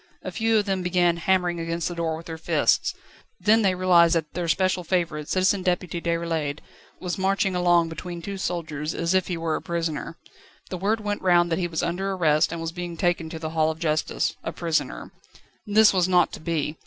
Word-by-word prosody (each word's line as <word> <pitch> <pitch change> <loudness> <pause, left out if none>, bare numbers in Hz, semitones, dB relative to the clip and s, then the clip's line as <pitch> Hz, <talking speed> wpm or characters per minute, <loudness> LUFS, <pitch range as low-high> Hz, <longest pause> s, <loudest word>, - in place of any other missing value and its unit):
A - - -5
few 225 0 +1
of 210 - +1
them 195 -2 -1
began 180 -1 +2
hammering 180 -1 +1
against 165 0 -2
the 175 - -4
door 165 -2 -2
with 165 - -11
their 160 -1 -7
fists; - - +1 0.4
then 220 +2 +4
they 190 -3 +2
realised 175 -2 +4
that 160 -2 -2
their 175 -1 -3
special 185 +3 +1
favourite, 165 -4 -1
Citizen 190 +1 +2
Deputy 180 -2 -1
Déroulède, 165 -4 -1 0.4
was 180 0 -4
marching 195 0 +1
along 175 -1 +3
between 175 +1 -6
two 195 +3 -6
soldiers, 160 -4 -3
as 170 +2 0
if 185 -1 +2
he 175 - -2
were 165 -1 -1
a - - -4
prisoner. 165 -1 -3 0.5
The 185 - -3
word 215 +4 0
went 205 -1 -3
round 175 -2 +3
that 165 - +1
he 175 - 0
was 160 -2 -3
under 190 +3 -1
arrest, 155 -5 +2
and 170 - -4
was 165 0 -3
being 175 -1 -6
taken 175 -2 0
to 160 - -6
the 160 -1 -5
Hall 160 -1 +2
of 160 - -4
Justice 155 -2 -1
a - - -3
prisoner. 165 -1 -2 0.6
This 210 +1 +5
was 185 -2 +2
not 180 -2 +3
to - - -7
be. 155 -1 -2
175 Hz, 210 wpm, -24 LUFS, 165-185 Hz, 0.6 s, This